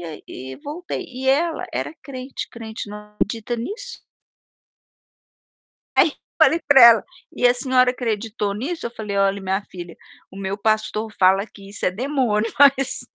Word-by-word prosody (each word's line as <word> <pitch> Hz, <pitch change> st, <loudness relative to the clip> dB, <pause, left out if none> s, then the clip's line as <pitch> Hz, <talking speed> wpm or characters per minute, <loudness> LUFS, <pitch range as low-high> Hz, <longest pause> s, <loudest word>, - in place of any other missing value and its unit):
e -, -, -8 dB
aí 160 Hz, -3 st, -8 dB
e 130 Hz, +1 st, -8 dB
voltei, 345 Hz, -, -6 dB
e 260 Hz, +1 st, -4 dB
ela 320 Hz, +4 st, +1 dB
era -, -, -3 dB
crente 260 Hz, -1 st, -7 dB
crente 220 Hz, -2 st, -8 dB
não 210 Hz, +1 st, -7 dB, 0.2 s
acredita 225 Hz, +4 st, -2 dB
nisso. 450 Hz, -, -6 dB, 2.0 s
Aí, -, -, +5 dB, 0.3 s
falei 330 Hz, -, +5 dB
para 285 Hz, -2 st, +8 dB
ela: 230 Hz, -3 st, +8 dB, 0.3 s
"E 250 Hz, -, +3 dB
a 245 Hz, -, +3 dB
senhora 255 Hz, 0 st, +3 dB
acreditou 225 Hz, -4 st, -2 dB
nisso?". 285 Hz, +10 st, -4 dB
Eu -, -, -5 dB
falei: 210 Hz, -3 st, -5 dB
"Olhe 195 Hz, 0 st, +2 dB
minha 190 Hz, +1 st, -1 dB
filha, 175 Hz, -2 st, -9 dB, 0.3 s
o -, -, -13 dB
meu 195 Hz, 0 st, -3 dB
pastor 215 Hz, +1 st, 0 dB
fala 190 Hz, +2 st, +4 dB
que 200 Hz, -3 st, -15 dB
isso 200 Hz, -, -3 dB
é -, -, +3 dB
demônio 230 Hz, -1 st, 0 dB
mas, 270 Hz, -1 st, +4 dB
225 Hz, 160 wpm, -22 LUFS, 200-265 Hz, 2.0 s, para